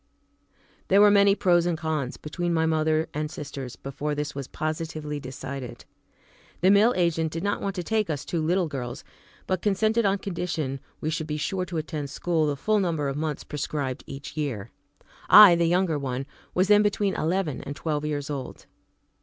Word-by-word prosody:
There 195 - +5
were 205 0 +7
many 200 -1 +5
pros 175 -4 +3
and 170 -2 0
cons 155 -5 -2
between 170 +3 -2
my 160 0 +2
mother 155 0 +1
and 150 0 -2
sisters 140 -4 -7
before 145 +2 -4
this 150 0 -3
was 140 -2 -5
positively 155 -1 -4
decided. 130 -1 -7 0.8
The 185 +2 +5
mill 210 +4 +5
agent 165 -3 +1
did 165 +2 -4
not 205 0 -1
want 195 -1 -2
to 180 - -3
take 215 +1 0
us 150 -1 -3
two 170 - -2
little 175 +3 +1
girls, 125 -5 -5 0.4
but 185 -1 -1
consented 215 +3 +2
on 200 -1 +2
condition 170 -8 -3 0.2
we 155 - -1
should 160 -1 -3
be 150 -1 -2
sure 185 +4 -2
to 170 -2 -5
attend 150 -2 -4
school 160 +2 0
the 145 -1 -1
full 215 +7 +1
number 160 -7 0
of 135 - -3
months 150 0 -3
prescribed 140 -3 -3
each 135 +2 -8
year. 125 -9 -3 0.6
I, 210 -4 +10
the 170 0 +2
younger 175 -3 +1
one, 130 -1 -3 0.3
was 185 +1 +3
then 210 0 +6
between 205 -1 +1
eleven 165 -2 -1
and 140 - -6
twelve 150 -2 -2
years 150 -1 -3
old. 135 -3 -6
160 Hz, 185 wpm, -26 LUFS, 145-185 Hz, 0.8 s, I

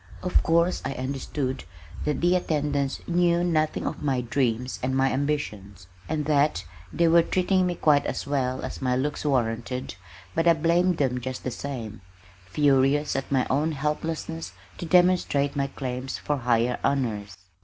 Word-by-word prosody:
Of 180 - +2
course 170 +2 +2
I 135 - -2
understood 130 0 -3 0.4
that 150 -3 -1
the 175 +1 +4
attendants 145 -5 -1
knew 175 0 +2
nothing 155 -3 0
of - - -4
my 135 -4 0
dreams 125 0 -1
and 130 +1 0
my 135 0 +3
ambitions, 105 - -3 0.2
and 150 -1 -1
that 145 - +2 0.3
they 170 - +2
were 170 +1 +6
treating 185 +2 +1
me 175 - -1
quite 150 -3 +3
as - - -3
well 130 -3 -1
as - - -7
my 125 -1 +1
looks 145 +3 -2
warranted, 125 -1 -1 0.4
but 165 - +1
I 170 - +8
blamed 170 +2 +2
them 130 -4 0
just 130 +1 -5
the 130 - -2
same, 115 -6 -6 0.5
furious 140 +4 +2
at 135 +1 -3
my 130 -2 +2
own 150 +4 +1
helplessness 160 +3 -3 0.3
to 170 - -5
demonstrate 175 -5 +3
my 140 -1 0
claims 130 -1 -5
for 145 - -2
higher 120 -1 +1
honors. 110 -9 -1
140 Hz, 160 wpm, -26 LUFS, 130-160 Hz, 0.5 s, I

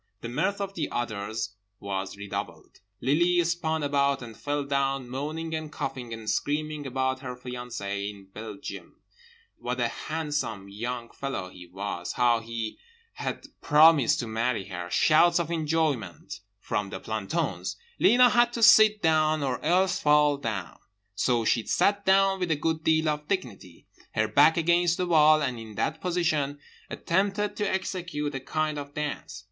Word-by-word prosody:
The 115 - -5
mirth 185 +11 -1
of 195 -1 -3
the - - -3
others 110 -2 -3 0.3
was 95 -1 -4
redoubled. 100 0 -7 0.2
Lily 175 +5 +3
spun 160 -2 -1
about 140 -2 +1
and 115 -2 -9
fell 145 +3 -2
down, 135 -2 -1
moaning 155 +6 -4
and 155 -1 -4
coughing, 130 -4 -5
and 115 -1 -7
screaming 150 +3 -1
about 130 0 -1
her 130 -2 -6
fiancée 120 -5 -5
in 100 -2 -11
Belgium: 110 -2 -8 0.6
what 125 +1 -3
a 120 -1 +1
handsome 145 -9 -3
young 115 +3 -5
fellow 135 -10 -5
he 90 -1 -12
was, 90 -1 -5
how 120 -1 +3
he 115 -1 -5 0.3
had - - -5 0.2
promised 150 -4 +5
to 120 - -5
marry 110 -1 -1
her… 90 -1 -5
shouts 165 - +4
of 170 -1 -2
enjoyment 150 - -1 0.2
from 105 -1 -2
the 95 - -6
plantons. 110 - -3 0.2
Lena 245 +1 +6
had 240 0 +4
to 235 - -1
sit 215 -1 +7
down 155 -1 +3
or 130 -2 -2
else 185 +4 +2
fall 150 -1 +4
down, 110 -9 -5 0.3
so 115 +3 +1
she 115 +1 +2
sat 200 0 +2
down 195 0 +4
with 180 -2 -1
a 160 - +3
good 160 +1 -1
deal 160 0 +2
of 150 0 -2
dignity, 105 - -4 0.3
her 110 0 +2
back 145 +9 +5
against 170 +1 +3
the 180 - 0
wall, 155 -2 +5
and 125 -4 -2
in 110 -2 -10
that 155 +8 -2
position 155 -6 0 0.3
attempted 200 +3 0
to 205 -1 -1
execute 180 -6 -3
a 135 - -3
kind 155 +2 -2
of 145 0 -9
dance. 150 -7 -4
145 Hz, 160 wpm, -27 LUFS, 115-165 Hz, 0.6 s, sit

